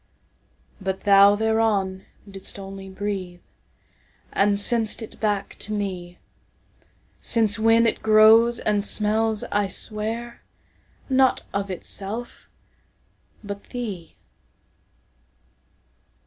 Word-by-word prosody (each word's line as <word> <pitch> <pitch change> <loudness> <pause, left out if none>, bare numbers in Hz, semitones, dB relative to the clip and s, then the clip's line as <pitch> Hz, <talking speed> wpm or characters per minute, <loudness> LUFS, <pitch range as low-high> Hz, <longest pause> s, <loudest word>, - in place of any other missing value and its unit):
But 190 0 -3
thou 200 0 +6
thereon 210 -3 0 0.2
didst 195 0 -6
only 195 0 -9
breatheAnd 195 +1 -5
sent'st 225 +1 +1
it 220 - -12
back 205 -2 -2
to 215 - -4
me; 180 -4 -5 1.0
Since 220 -2 +2
when 225 +1 +4
it 230 - -1
grows, 220 +2 +5
and 205 -1 0
smells, 215 +1 +2
I 205 -1 +1
swear, 220 +4 -3 0.7
Not 260 -1 +2
of 200 0 -2
itself 200 +5 -5 0.9
but 200 -1 -7
thee! 205 -10 -7
205 Hz, 90 wpm, -23 LUFS, 195-225 Hz, 1.0 s, thou